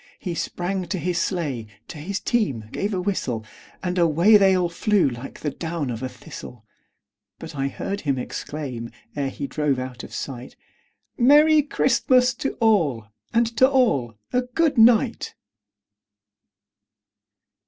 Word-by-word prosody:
He 180 - -4
sprang 180 +2 -3
to 180 - -2
his 175 0 -1
sleigh, 145 - -2 0.2
to 150 - -9
his 195 +6 -3
team 140 - -1
gave 200 +2 -2
a 190 - -1
whistle, 130 - -2 0.4
And 180 0 -1
away 170 +6 +5
they 195 -2 +6
all 180 -1 +1
flew 195 +3 +2
like 125 +1 -7
the 150 - -2
down 160 -5 -4
of 115 0 -5
a 130 - -3
thistle; 125 -2 -11 0.7
But - - -9
I 135 -1 -1
heard 200 +8 -4
him 140 -3 0
exclaim, 125 -2 -5 0.3
ere 140 -2 -1
he 140 - -5
drove 140 0 0
out 130 -1 -6
of - - -10
sight, 130 -2 -6 0.6
"Merry 300 +5 +6
Christmas 255 -2 +2
to 275 - -2
all, 160 - +1 0.2
and 235 +1 +3
to 260 - +6
all 140 - +1 0.2
a 250 - +3
good 280 +5 0
night!" 235 +1 +4
175 Hz, 145 wpm, -23 LUFS, 135-220 Hz, 0.7 s, they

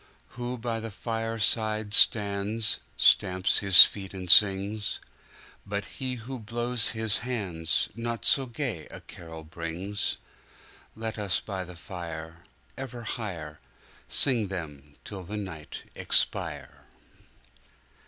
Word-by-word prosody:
Who 125 +1 -5
by 115 -1 -3
the 115 0 -6
fireside 110 -1 -1
stands 105 +1 +4 0.2
Stamps 95 +1 +3
his 95 -2 +10
feet 95 -1 -6
and 90 -2 -1
sings; 100 +2 +4 0.6
But 100 0 -4
he 130 +2 -5
who 125 +2 -8
blows 120 +1 0
his 110 -2 0
handsNot 115 +1 -2
so 135 -2 +2
gay 115 - -5
a - - -11
carol 80 -2 -11
brings, 85 +6 -3 0.8
Let 110 0 -5
us 100 -3 +1
by 95 -3 -5
the 90 0 -11
fire 85 -2 -8 0.4
Ever 125 -3 -7
higherSing 105 - -1
them 75 -6 -8
till 95 -3 -8
the 105 +4 -6
night 95 -7 -7
expire! - - -1
105 Hz, 110 wpm, -27 LUFS, 90-115 Hz, 0.8 s, his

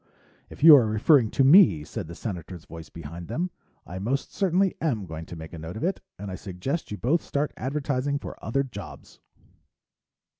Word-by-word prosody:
"If - - -10
you 160 -2 +11
are 120 -5 +3
referring 110 +3 +4
to 135 - +2
me," 135 - +7
said 75 - -6
the 85 - -9
Senator's 90 -4 -7
voice 80 0 -10
behind 85 +2 -9
them, 175 - -2 0.3
"I 90 +2 -7
most 130 +8 -2
certainly 190 0 +2
am 120 -11 -1
going 80 -1 -8
to - - -8
make 80 0 -9
a 85 - -7
note 80 +6 -7
of - - -5
it. 185 +2 -1 0.2
And 100 -1 -6
I - - -4
suggest 105 - -4
you 105 - -5
both 150 +10 +1
start 145 +1 -2
advertising 140 0 -2
for - - -9
other 135 +5 0
jobs." 105 -7 -10
115 Hz, 190 wpm, -26 LUFS, 85-145 Hz, 0.3 s, you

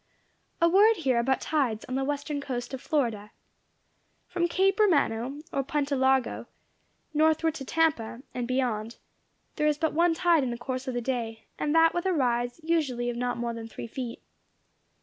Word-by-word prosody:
A 335 - +5
word 410 +6 +6
here 260 -7 +1
about 260 +1 +1
tides 260 -8 0
on 255 - -6
the 270 +1 0
western 285 +1 -2
coast 245 -2 -5
of 260 - -5
Florida. 230 -9 -1 1.0
From 345 -1 0
Cape 385 +4 +2
Romano, 285 - +2
or 275 - +1
Punta 285 +1 -1
Largo, 265 -1 +1 0.7
northward 315 +1 +3
to 275 -4 -7
Tampa, 265 -7 0
and 245 -1 -3
beyond, 240 -3 -1 0.6
there 300 - +2
is 300 -1 +2
but 320 0 0
one 335 +1 +3
tide 340 -2 +3
in 260 - -1
the 240 - -4
course 255 +2 -5
of 255 - -3
the 245 - -1
day, 230 -3 -3
and 300 +1 0
that 325 0 +5
with 350 +2 -1
a 375 - +2
rise 245 -3 0
usually 270 -8 0
of - - -7
not 245 0 -2
more 235 0 -2
than 230 -1 -7
three 225 - -8
feet. 235 0 -6
265 Hz, 180 wpm, -27 LUFS, 240-320 Hz, 1.0 s, word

